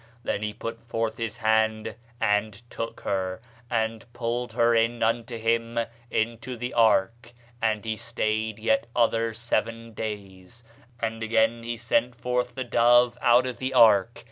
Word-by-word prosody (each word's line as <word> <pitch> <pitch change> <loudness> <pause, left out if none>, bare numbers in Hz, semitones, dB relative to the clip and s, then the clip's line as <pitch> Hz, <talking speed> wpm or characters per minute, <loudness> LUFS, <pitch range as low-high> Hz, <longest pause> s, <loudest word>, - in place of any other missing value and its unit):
Then 100 - -2
he 105 0 -2
put 115 +1 -6
forth 115 -1 -2
his 115 -1 -3
hand, 110 -1 +1 0.3
and 105 -1 +1
took 115 - -5
her, 95 -1 -2 0.3
and 115 -1 -1
pulled 120 +1 -2
her 120 0 +3
in 115 +1 +2
unto 115 +1 0
him 115 +1 0 0.3
into 115 +2 -2
the 125 +2 -4
ark. 115 +1 +2 0.3
And 110 -2 0
he 110 -1 -1
stayed 110 -1 -2
yet 110 +1 +1
other 115 -1 +2
seven 115 0 -2
days; 105 0 -7 0.4
and 115 -1 -3
again 115 +1 +2
he 120 0 -4
sent 120 +1 0
forth 125 0 -2
the 130 - -2
dove 120 0 +4
out 120 +1 +5
of 125 -2 -5
the 130 0 -3
ark. 110 -1 +5
115 Hz, 150 wpm, -26 LUFS, 110-120 Hz, 0.4 s, out